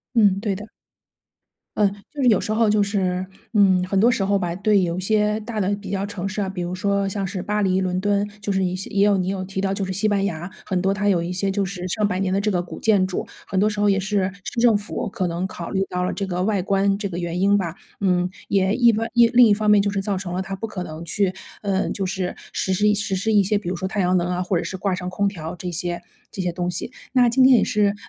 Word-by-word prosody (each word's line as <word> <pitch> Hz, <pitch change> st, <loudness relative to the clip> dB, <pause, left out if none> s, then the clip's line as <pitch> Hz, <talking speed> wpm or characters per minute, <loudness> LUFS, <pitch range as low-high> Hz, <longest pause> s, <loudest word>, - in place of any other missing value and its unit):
嗯， 200 Hz, -4 st, +4 dB
对 205 Hz, -2 st, -1 dB
的。 210 Hz, +3 st, -9 dB, 1.1 s
嗯， 210 Hz, -1 st, +4 dB, 0.3 s
就 290 Hz, -, -4 dB
是 255 Hz, -, +3 dB
有 215 Hz, -5 st, +5 dB
时 -, -, -3 dB
候 225 Hz, 0 st, +3 dB
就 210 Hz, 0 st, +3 dB
是， 185 Hz, -2 st, -1 dB, 0.3 s
嗯， 195 Hz, -4 st, +5 dB
很 195 Hz, -, 0 dB
多 230 Hz, +5 st, +5 dB
时 200 Hz, -5 st, 0 dB
候 200 Hz, 0 st, +2 dB
吧， 175 Hz, -3 st, -2 dB
对 200 Hz, +2 st, +2 dB
有 175 Hz, -1 st, -1 dB
一 -, -, -1 dB
些 210 Hz, +2 st, +1 dB
大 220 Hz, +1 st, -6 dB
的 195 Hz, +1 st, +1 dB
比 200 Hz, -1 st, -9 dB
较 195 Hz, 0 st, -1 dB
城 200 Hz, -2 st, -4 dB
市 195 Hz, +2 st, -3 dB
啊， 195 Hz, -, -1 dB
比 190 Hz, -2 st, -5 dB
如 175 Hz, +1 st, -3 dB
说 200 Hz, +1 st, 0 dB
像 195 Hz, 0 st, -2 dB
是 185 Hz, 0 st, -4 dB
巴 210 Hz, +2 st, -1 dB
黎 190 Hz, -1 st, +2 dB
伦 185 Hz, -1 st, -1 dB
敦， 205 Hz, 0 st, +1 dB
就 205 Hz, -, -2 dB
是 190 Hz, -, +1 dB
你 185 Hz, -1 st, 0 dB
是 185 Hz, -, -6 dB
也 200 Hz, 0 st, +3 dB
有 205 Hz, -1 st, +4 dB
你 185 Hz, 0 st, -1 dB
有 195 Hz, -1 st, -2 dB
提 190 Hz, 0 st, -4 dB
到 195 Hz, 0 st, 0 dB
就 195 Hz, 0 st, -2 dB
是 190 Hz, -, -3 dB
西 200 Hz, +4 st, -2 dB
班 205 Hz, -2 st, +2 dB
牙， 175 Hz, -1 st, -4 dB
很 185 Hz, -3 st, -1 dB
多 195 Hz, +1 st, +2 dB
它 205 Hz, +1 st, -1 dB
有 180 Hz, -4 st, +2 dB
一 175 Hz, -, -4 dB
些 190 Hz, +2 st, -1 dB
就 200 Hz, +1 st, 0 dB
是 185 Hz, -1 st, -4 dB
上 210 Hz, +3 st, 0 dB
百 195 Hz, -3 st, -1 dB
年 190 Hz, -1 st, 0 dB
的 195 Hz, -, +1 dB
这 210 Hz, +1 st, 0 dB
个 180 Hz, -2 st, +1 dB
古 175 Hz, -, -9 dB
建 200 Hz, -4 st, +3 dB
筑， 185 Hz, -, -3 dB, 0.2 s
很 195 Hz, -, -3 dB
多 205 Hz, +3 st, +4 dB
时 210 Hz, -1 st, -5 dB
候 205 Hz, 0 st, +3 dB
也 195 Hz, -, +3 dB
是 195 Hz, 0 st, 0 dB
市 235 Hz, -, -4 dB
政 230 Hz, -3 st, +5 dB
府 205 Hz, +3 st, -4 dB
可 195 Hz, -3 st, -2 dB
能 175 Hz, +2 st, -2 dB
考 170 Hz, -2 st, -7 dB
虑 190 Hz, -, 0 dB
到 180 Hz, 0 st, -2 dB
了 180 Hz, -, 0 dB
这 195 Hz, -, -3 dB
个 180 Hz, -1 st, -1 dB
外 205 Hz, -1 st, +1 dB
观 195 Hz, +1 st, +1 dB
这 205 Hz, 0 st, -3 dB
个 175 Hz, -3 st, -6 dB
原 175 Hz, 0 st, -3 dB
因 200 Hz, +2 st, +4 dB
吧。 170 Hz, -5 st, -2 dB, 0.3 s
嗯， 180 Hz, -2 st, +2 dB, 0.2 s
也 195 Hz, 0 st, +2 dB
一 240 Hz, -2 st, +5 dB
方 225 Hz, +1 st, -1 dB
一 235 Hz, -1 st, +6 dB
另 245 Hz, 0 st, +7 dB
一 210 Hz, -, +5 dB
方 210 Hz, 0 st, +2 dB
面 210 Hz, -1 st, +6 dB
就 200 Hz, -, 0 dB
是 200 Hz, -1 st, -1 dB
造 195 Hz, 0 st, -1 dB
成 185 Hz, -2 st, -5 dB
了 185 Hz, -, -1 dB
它 195 Hz, +1 st, -6 dB
不 225 Hz, -, -4 dB
可 190 Hz, -4 st, -5 dB
能 155 Hz, 0 st, -8 dB
去， 185 Hz, +3 st, 0 dB, 0.3 s
嗯， 195 Hz, -2 st, 0 dB
就 195 Hz, -, -2 dB
是 185 Hz, -1 st, -3 dB, 0.2 s
实 190 Hz, -, -1 dB
施 205 Hz, +3 st, +1 dB
一 -, -, +4 dB
实 205 Hz, -1 st, -1 dB
施 200 Hz, +4 st, 0 dB
一 210 Hz, -2 st, +5 dB
些， 205 Hz, +2 st, +1 dB
比 205 Hz, -4 st, -4 dB
如 180 Hz, -, -2 dB
说 190 Hz, -, -2 dB
太 205 Hz, 0 st, -1 dB
阳 180 Hz, 0 st, +3 dB
能 175 Hz, 0 st, 0 dB
啊， 180 Hz, 0 st, -1 dB
或 180 Hz, 0 st, 0 dB
者 165 Hz, -, -1 dB
是 190 Hz, -, -4 dB
挂 195 Hz, 0 st, -1 dB
上 180 Hz, 0 st, -4 dB
空 200 Hz, +2 st, -1 dB
调 165 Hz, -3 st, -7 dB
这 180 Hz, +1 st, -5 dB
些 175 Hz, 0 st, -3 dB, 0.3 s
这 195 Hz, -, -4 dB
些 180 Hz, -1 st, -1 dB
东 175 Hz, +1 st, -2 dB
西。 180 Hz, +7 st, -5 dB, 0.2 s
那 250 Hz, -2 st, +5 dB
今 240 Hz, +3 st, +2 dB
天 260 Hz, -1 st, +7 dB
也 -, -, +3 dB
是， 210 Hz, -3 st, +2 dB
呃， 200 Hz, -, 0 dB
195 Hz, 315 characters per minute, -22 LUFS, 185-205 Hz, 1.1 s, 另